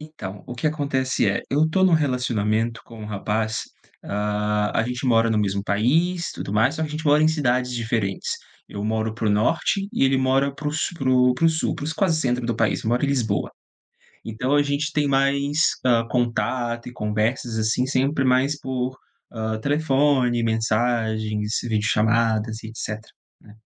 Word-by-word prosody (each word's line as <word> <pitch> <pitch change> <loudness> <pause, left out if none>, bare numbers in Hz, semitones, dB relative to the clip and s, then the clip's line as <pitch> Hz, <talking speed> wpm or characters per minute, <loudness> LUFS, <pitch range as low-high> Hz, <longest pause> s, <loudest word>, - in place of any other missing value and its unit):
Então, 110 -11 -8
o 125 - -6
que 125 - -2
acontece 135 -7 0
é, 100 - -1
eu 150 +3 +3
tô 190 +4 +2
num 185 - +4
relacionamento 120 -6 0
com 115 -2 -11
um 105 - -6
rapaz, 110 +1 -2 0.4
hã, 105 0 -1
a - - +2
gente 125 +2 -4
mora 115 -1 +4
no 110 - +2
mesmo 100 -1 0
país, 160 - +1
tudo - - -6
mais, 110 +8 +3
só 160 - -2
que 155 - -2
a - - -10
gente 155 +1 -5
mora 150 +1 +5
em 155 - +5
cidades 125 -5 0
diferentes. 110 -5 -2 0.4
Eu 100 0 -5
moro 110 0 -1
para 115 -1 -3
o - - +3
Norte 165 - +1
e 185 - +2
ele 135 0 +3
mora 135 +1 +1
para 150 +1 -4
o - - -2
s 160 +3 -2
para 135 -5 -2
o 125 +5 +4
Sul, 160 0 -1
para - - -6
os 160 - -2
quase 165 -4 +1
centro 125 -3 0
do 120 - 0
país, 115 -1 0
mora 120 +5 +1
em - - 0
Lisboa. 115 -7 0 0.8
Então 125 +5 -1
a 145 - +4
gente 145 +2 -1
tem 150 -1 +1
mais, 140 +2 +2
hã, 115 -2 +3
contato 120 0 -1
e 125 - -8
conversas, 110 +2 -1
assim, 110 +3 +1
sempre 135 +2 +1
mais 130 +3 +2
por, 130 -1 -3 0.3
hã, 110 -1 -3
telefone, 140 -3 +2
mensagens, 110 -1 0
videochamadas 110 0 +1
e 110 - -7
etcétera, 110 -1 -7 0.3
né. 105 - -16
125 Hz, 185 wpm, -23 LUFS, 110-140 Hz, 0.8 s, mora